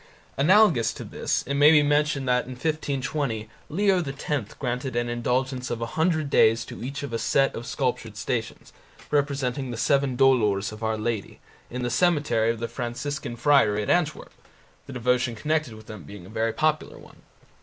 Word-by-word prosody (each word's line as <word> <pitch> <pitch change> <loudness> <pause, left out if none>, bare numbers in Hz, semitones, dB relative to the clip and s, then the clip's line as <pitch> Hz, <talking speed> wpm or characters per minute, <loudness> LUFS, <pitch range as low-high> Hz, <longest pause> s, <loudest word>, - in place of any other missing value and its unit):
Analogous 165 - +4
to - - -8
this - - -2
it 140 - -3
may 145 +1 +6
be 150 -2 +6
mentioned 145 -2 +1
that 125 0 +2
in 130 - -7
1520 135 -5 -2 0.2
Leo 190 +2 +2
X 135 -4 -4
granted 125 +1 -3
an 120 0 0
indulgence 125 +2 -1
of 120 - -3
a 115 - -2
hundred 160 -3 +1
days 115 -3 +4
to - - -9
each 140 +3 -5
of 140 -4 -6
a 115 - -1
set 135 +3 +2
of 120 - -7
sculptured 125 -5 -2
Stations, 115 0 -4 0.4
representing 140 -2 0
the 120 - -5
Seven 135 +1 +1
Dolours 110 -7 +3
of 105 0 -10
Our 110 0 -1
Lady, 110 -2 -3 0.3
in 125 +1 -4
the 120 - -1
cemetery 145 -7 +2
of 115 -1 -1
the 115 - -2
Franciscan 120 +3 -4
Friary 120 -6 +3
at - - 0
Antwerp, 160 -4 0 0.5
the 135 - -8
devotion 125 0 0
connected 150 +1 -1
with 110 0 -13
them 110 -3 -9
being 90 +4 -11
a - - -13
very 115 +1 -1
popular 155 +4 -1
one. - - -16
125 Hz, 180 wpm, -25 LUFS, 115-145 Hz, 0.5 s, may